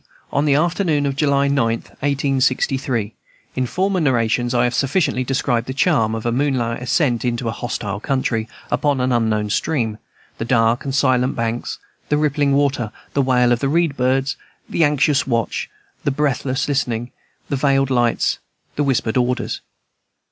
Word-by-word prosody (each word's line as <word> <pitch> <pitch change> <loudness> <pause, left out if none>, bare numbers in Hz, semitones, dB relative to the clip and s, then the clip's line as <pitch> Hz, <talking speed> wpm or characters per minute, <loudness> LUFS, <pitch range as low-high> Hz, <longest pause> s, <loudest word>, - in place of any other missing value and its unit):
on 140 +2 +1
the 140 -2 +3
afternoon 165 -2 +1
of 140 -1 -1
July 140 -1 +2
9th, 115 -5 0
1863. 135 -4 0 0.4
In 130 -1 0
former 190 +6 0
narrations 120 -4 +1
I 120 -1 +2
have 120 0 +1
sufficiently 135 -1 +1
described 125 -2 0
the 130 - -4
charm 115 -4 +2
of 110 - -5
a 120 - +1
moonlight 125 -3 0
ascent 125 -3 +1
into 120 -1 -1
a - - 0
hostile 105 -3 -4
country, 115 -2 -1 0.2
upon 145 -2 +1
an 125 0 +1
unknown 110 -3 +1
stream, 110 -3 -1 0.4
the - - -1
dark 115 0 +2
and 135 -1 -2
silent 130 -2 +2
banks, 115 0 -2 0.3
the 150 - +2
rippling 145 -1 +1
water, 140 -6 +1 0.2
the 140 - +2
wail 125 -2 +3
of 120 - +2
the 135 - 0
reed 165 -1 +1
birds, 135 +2 0 0.3
the 165 - +1
anxious 145 -1 +2
watch, 115 -4 -1 0.3
the - - +1
breathless 135 -1 0
listening, 120 -4 -1 0.4
the 140 - 0
veiled 135 0 +2
lights, 120 -2 +1 0.4
the 145 - +2
whispered 125 -5 0
orders. 125 0 -1
130 Hz, 160 wpm, -20 LUFS, 120-140 Hz, 0.4 s, the